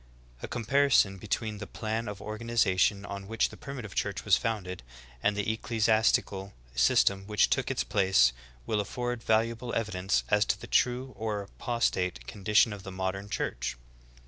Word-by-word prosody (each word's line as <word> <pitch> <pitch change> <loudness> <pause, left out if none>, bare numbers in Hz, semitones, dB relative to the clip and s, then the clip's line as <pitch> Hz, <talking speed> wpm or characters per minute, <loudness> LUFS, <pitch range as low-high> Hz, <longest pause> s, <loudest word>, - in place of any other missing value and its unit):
2. - - -5
A - - -8
comparison 120 -5 +3
between 105 +1 -3
the 105 - -6
plan 110 +1 -3
of 105 -1 -5
organization 105 -3 +1
on 100 -1 -6
which 115 +1 +1
the - - -11
Primitive 125 -7 -7
Church 100 -1 -2
was 100 -1 +6
founded 105 - -3 0.4
and 100 +7 +1
the 105 - 0
ecclesi 110 0 0
astical 100 -3 +1 0.2
system 95 +10 +3
which 105 -3 +3
took - - +1
its - - 0
place 65 -5 +3 0.3
will 105 - 0
afford 120 +2 -3
valuable 115 +2 0
evi 110 -2 -1
dence 90 - 0
as - - +4
to - - -1
the - - -8
true 125 +1 +1
or 105 -2 -3
apostate 95 - -1
condition 105 - +2
of 100 - -8
the 95 - -8
modern 95 +2 -3
Church. 65 - -3
105 Hz, 170 wpm, -29 LUFS, 95-115 Hz, 0.4 s, was